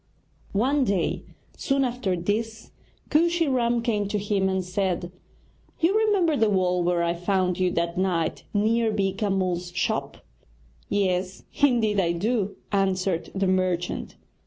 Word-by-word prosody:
One 270 Hz, +6 st, +2 dB
day, 195 Hz, -7 st, -1 dB, 0.3 s
soon 275 Hz, -1 st, +1 dB
after 240 Hz, -7 st, -1 dB
this, 220 Hz, +5 st, -3 dB, 0.4 s
Kooshy 335 Hz, +1 st, +3 dB
Ram 240 Hz, -3 st, +1 dB
came 210 Hz, -4 st, 0 dB
to 210 Hz, +1 st, -1 dB
him 200 Hz, -1 st, 0 dB
and 190 Hz, -1 st, -1 dB
said: 180 Hz, -2 st, -2 dB, 0.7 s
'You 345 Hz, +5 st, +2 dB
remember 405 Hz, -7 st, +3 dB
the 225 Hz, -5 st, +3 dB
wall 180 Hz, -2 st, +1 dB
where 175 Hz, 0 st, +1 dB
I 170 Hz, 0 st, +1 dB
found 180 Hz, 0 st, 0 dB
you 185 Hz, -1 st, +2 dB
that 170 Hz, +1 st, -1 dB
night, 175 Hz, -4 st, 0 dB
near 220 Hz, +2 st, +2 dB
Beeka 200 Hz, +1 st, -1 dB
Mull's 180 Hz, -2 st, -1 dB
shop?' 180 Hz, -, -1 dB, 0.7 s
'Yes, 190 Hz, -1 st, -1 dB, 0.2 s
indeed 230 Hz, -7 st, +3 dB
I 170 Hz, -2 st, +2 dB
do,' 205 Hz, +2 st, -1 dB, 0.2 s
answered 190 Hz, -3 st, 0 dB
the 195 Hz, 0 st, +1 dB
merchant. 185 Hz, -2 st, -1 dB
195 Hz, 135 wpm, -25 LUFS, 180-230 Hz, 0.7 s, Kooshy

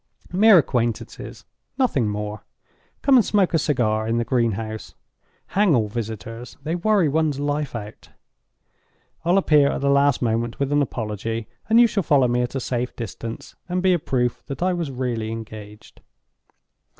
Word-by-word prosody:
Mere 210 Hz, +2 st, +7 dB
acquaintances, 120 Hz, -7 st, -2 dB, 0.3 s
nothing 215 Hz, -, +1 dB
more. 105 Hz, 0 st, -5 dB, 0.6 s
Come 270 Hz, -1 st, +6 dB
and 240 Hz, -, +5 dB
smoke 200 Hz, -4 st, +1 dB
a 165 Hz, -, +3 dB
cigar 110 Hz, -7 st, 0 dB
in 115 Hz, +1 st, 0 dB
the 120 Hz, -, 0 dB
greenhouse. 115 Hz, -3 st, -2 dB, 0.5 s
Hang 195 Hz, -5 st, +3 dB
all 110 Hz, -3 st, +1 dB
visitors—they 115 Hz, -, -6 dB
worry 190 Hz, 0 st, +2 dB
one's 150 Hz, -1 st, 0 dB
life 145 Hz, -2 st, -2 dB
out. 105 Hz, -2 st, -8 dB, 1.1 s
I'll 175 Hz, +3 st, +3 dB
appear 150 Hz, -7 st, +4 dB
at -, -, -3 dB
the 140 Hz, 0 st, +2 dB
last 140 Hz, -1 st, +3 dB
moment 115 Hz, -1 st, -1 dB
with 140 Hz, 0 st, -1 dB
an 145 Hz, 0 st, +3 dB
apology; 115 Hz, -3 st, -3 dB, 0.2 s
and 225 Hz, +1 st, +6 dB
you 240 Hz, -, +8 dB
shall 215 Hz, -3 st, 0 dB
follow 145 Hz, -6 st, +3 dB
me 120 Hz, 0 st, +1 dB
at 125 Hz, +2 st, -3 dB
a -, -, 0 dB
safe 125 Hz, 0 st, -3 dB
distance, 115 Hz, 0 st, -7 dB
and 180 Hz, +1 st, -1 dB
be 185 Hz, -1 st, +4 dB
a 175 Hz, -, +1 dB
proof 125 Hz, -4 st, -1 dB
that 140 Hz, +4 st, -4 dB
I 185 Hz, 0 st, +2 dB
was 170 Hz, -4 st, -2 dB
really 125 Hz, -4 st, -3 dB
engaged." 110 Hz, -2 st, -10 dB
130 Hz, 160 wpm, -23 LUFS, 115-160 Hz, 1.1 s, you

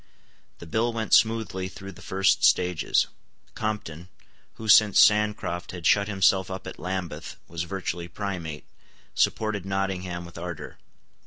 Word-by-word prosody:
The -, -, -11 dB
bill 110 Hz, +8 st, 0 dB
went 115 Hz, -1 st, -3 dB
smoothly 110 Hz, -4 st, +3 dB
through 95 Hz, +1 st, -9 dB
the 85 Hz, -, -15 dB
first 95 Hz, 0 st, +1 dB
stages. 90 Hz, -3 st, +3 dB, 0.5 s
Compton, 95 Hz, -5 st, -4 dB, 0.5 s
who, 110 Hz, -, -8 dB
since 105 Hz, -1 st, +6 dB
Sancroft 105 Hz, -5 st, +3 dB
had 90 Hz, -2 st, -7 dB
shut 100 Hz, -1 st, +4 dB
himself 95 Hz, -1 st, +2 dB
up 95 Hz, -1 st, -6 dB
at -, -, -8 dB
Lambeth, 90 Hz, -2 st, -5 dB
was 85 Hz, 0 st, -4 dB
virtually 90 Hz, -1 st, -4 dB
Primate, 85 Hz, -5 st, -5 dB, 0.5 s
supported 110 Hz, -3 st, 0 dB
Nottingham 95 Hz, -2 st, -3 dB
with 85 Hz, 0 st, -10 dB
ardour. 85 Hz, -2 st, -7 dB
95 Hz, 135 wpm, -26 LUFS, 85-105 Hz, 0.5 s, since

